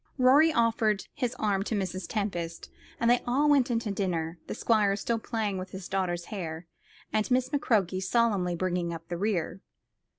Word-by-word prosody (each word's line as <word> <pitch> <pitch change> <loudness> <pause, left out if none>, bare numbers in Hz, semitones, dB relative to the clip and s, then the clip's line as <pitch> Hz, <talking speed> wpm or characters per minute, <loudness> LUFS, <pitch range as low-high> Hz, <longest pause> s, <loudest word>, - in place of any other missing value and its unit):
Rorie 280 +5 +6
offered 225 -5 +1
his 255 -3 -2
arm 205 -5 0
to 220 - -1
Mrs. 185 -2 -3
Tempest, 175 -6 -3 0.3
and 235 - +1
they 245 +1 +4
all 275 +5 +2
went 280 -4 +4
in 235 - +1
to 220 -3 -3
dinner, 170 -4 -2
the - - -4
squire 210 -4 +2
still 230 +3 -1
playing 215 -4 -2
with 185 0 -6
his 190 -1 -8
daughter's 180 -3 -1
hair, 165 -4 -5 0.5
and 215 +3 +1
Miss 255 0 +2
McCroke 210 - +1
solemnly 195 -4 +1
bringing 175 -1 -1
up 165 0 -10
the 175 - -3
rear. 190 -2 -1
200 Hz, 175 wpm, -28 LUFS, 180-235 Hz, 0.5 s, Rorie